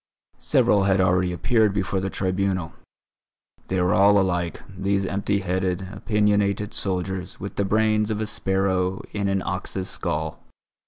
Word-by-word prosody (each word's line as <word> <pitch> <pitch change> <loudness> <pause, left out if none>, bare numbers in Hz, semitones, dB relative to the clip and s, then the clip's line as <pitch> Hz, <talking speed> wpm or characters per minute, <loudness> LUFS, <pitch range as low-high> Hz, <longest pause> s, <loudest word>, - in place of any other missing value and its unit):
Several 100 -2 +3
had 95 -1 +3
already 90 0 +2
appeared 100 +5 +2
before 95 0 0
the 95 +1 -2
Tribunal; 95 -3 -1 0.9
they 95 - 0
were 90 +2 +2
all 100 0 +5
alike, 90 -3 -1
these 100 +1 0
empty 100 +1 -1
headed, 95 0 -1
opinionated 105 -1 +1
soldiers 95 -1 -3
with 100 - -6
the 100 - 0
brains 110 +1 +2
of 110 -1 -1
a 110 - -1
sparrow 95 -2 0
in 100 -1 -1
an 95 -1 0
ox's 95 0 -4
skull. 80 -3 -3
95 Hz, 145 wpm, -24 LUFS, 90-100 Hz, 0.9 s, all